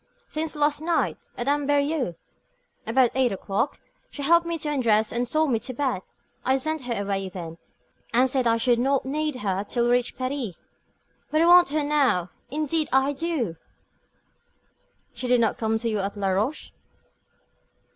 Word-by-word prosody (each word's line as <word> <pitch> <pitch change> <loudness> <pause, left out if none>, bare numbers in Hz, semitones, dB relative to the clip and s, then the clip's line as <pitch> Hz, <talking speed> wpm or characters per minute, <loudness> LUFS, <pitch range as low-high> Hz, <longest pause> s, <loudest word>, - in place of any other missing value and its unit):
"Since 310 +1 -3
last 295 0 +1
night, 330 +1 -1
at 240 - -3
Amberieux, 285 - +1 0.7
about 245 +1 +3
eight 260 -2 +2
o'clock. 195 +6 -2 0.3
She 285 - -7
helped 340 +3 +4
me 335 0 -1
to 305 - -3
undress, 225 -6 +2
and 240 +1 -1
saw 310 +5 +2
me 245 -7 +1
to 255 +2 -6
bed. 255 -8 -1 0.4
I 260 +1 +2
sent 310 0 -2
her 230 -4 -1
away 195 -1 -2
then, 170 -3 -8 0.5
and 250 +3 +4
said 260 -1 +1
I 230 0 +3
should 235 0 +2
not 270 +2 +1
need 300 +1 -1
her 195 -5 -2
till 235 +3 -1
we 240 - +2
reached 245 0 +1
Paris. 255 -7 -3 0.7
But 310 +1 +2
I - - +4
want 350 -1 +7
her 300 +1 0
now, 275 - +1 0.2
indeed 305 +3 0
I 265 +2 +3
do." 275 - -2 1.6
"She 245 +1 -4
did 250 0 +4
not 225 -2 +1
come 220 0 +1
to 230 +1 -3
you 215 -2 0
at 200 +1 -3
Laroche?" 200 +8 -1
255 Hz, 165 wpm, -25 LUFS, 225-295 Hz, 1.6 s, want